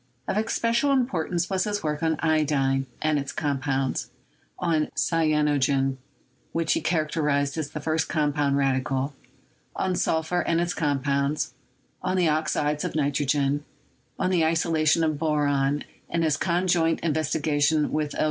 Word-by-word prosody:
Of - - -1
especial 230 +4 +1
im 260 -3 +3
portance 175 -4 -2
was 190 -1 0
his 205 -1 -2
work 150 -1 -2
on 160 -1 +1
iodine 140 -4 +1 0.2
and 155 -1 +2
its 140 - -4
compounds; 135 -2 -1 0.5
on 160 -4 +1
cyanogen, 145 -4 +2 0.6
which 165 -1 +1
he - - 0
characterized 150 -3 0
as 155 -3 -3
the 150 - -6
first 155 +1 -1
compound 145 -3 +1
radical; 135 0 0 0.6
on 185 -1 0
sulphur 160 +1 0
and 170 -1 +1
its 175 +1 0
compounds; 140 -1 0 0.5
on 185 0 -1
the 180 -2 +3
oxides 150 -1 0
of - - -3
nitrogen; 145 -1 +1 0.5
on 185 0 0
the 175 -3 +3
isolation 160 0 +2
of 155 -2 0
boron; 145 -2 +1 0.3
and 170 0 0
his 155 -3 +2
conjoint 170 0 +1
in 165 -3 0
vestigations 150 0 +1
with 150 -1 -1
L. - - -5
155 Hz, 145 wpm, -25 LUFS, 145-165 Hz, 0.6 s, im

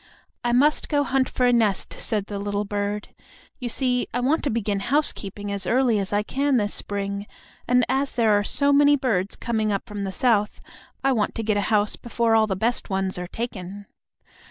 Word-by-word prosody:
"I 240 - +1
must 285 +5 +3
go 290 -1 +2
hunt 270 -1 +1
for 250 - 0
a 245 - +4
nest," 220 -5 +1
said 210 -3 -2
the 200 -1 -5
little 205 +1 -2
bird. 205 +1 -3 0.5
"You 250 -3 -3
see, 250 0 0
I 245 - -1
want 275 +6 +1
to - - +1
begin 210 -3 -1
housekeeping 205 -5 -1
as 200 -2 -3
early 245 -3 +3
as 195 - -3
I 205 0 +1
can 275 +4 +1
this 205 -2 0
spring, 200 0 -4 0.4
and 250 -1 +4
as 265 +2 0
there 225 -3 +3
are 205 - +2
so 280 +6 +1
many 290 +1 +6
birds 215 -8 -1
coming 220 -3 -1
up 200 - -2
from 205 -1 -5
the 195 - -3
South, 210 0 +1 0.4
I 270 - +3
want 220 -5 0
to 225 - -2
get 215 -1 +1
a 205 - +1
house 210 -1 +1
before 235 -1 0
all 220 -1 +4
the 190 - -1
best 230 +6 -1
ones 190 -1 -1
are 180 - -5
taken." 200 -2 -6
220 Hz, 205 wpm, -24 LUFS, 205-250 Hz, 0.5 s, many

